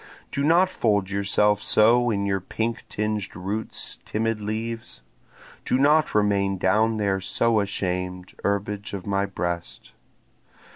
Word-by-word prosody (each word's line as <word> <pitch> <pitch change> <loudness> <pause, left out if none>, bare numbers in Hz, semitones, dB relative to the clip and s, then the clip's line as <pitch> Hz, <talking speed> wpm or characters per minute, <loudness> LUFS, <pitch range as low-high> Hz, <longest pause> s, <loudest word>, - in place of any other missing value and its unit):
Do 140 - -2
not 170 +5 +5
fold 105 - 0
yourself 100 +1 +2
so 120 +4 +4
in 100 -3 0
your 95 -1 0
pink 115 +5 -3
tinged 105 -2 -3
roots 100 +5 -5
timid 115 0 -2
leaves! 110 +2 -4 0.6
Do - - +1
not 150 +1 +3
remain 100 -2 +2
down 110 +5 +2
there 100 -2 0
so 115 +3 +1
ashamed, 90 -2 -3
herbage 100 0 -2
of 95 - -7
my 100 0 0
breast! 85 -3 -4
105 Hz, 130 wpm, -24 LUFS, 95-110 Hz, 0.6 s, not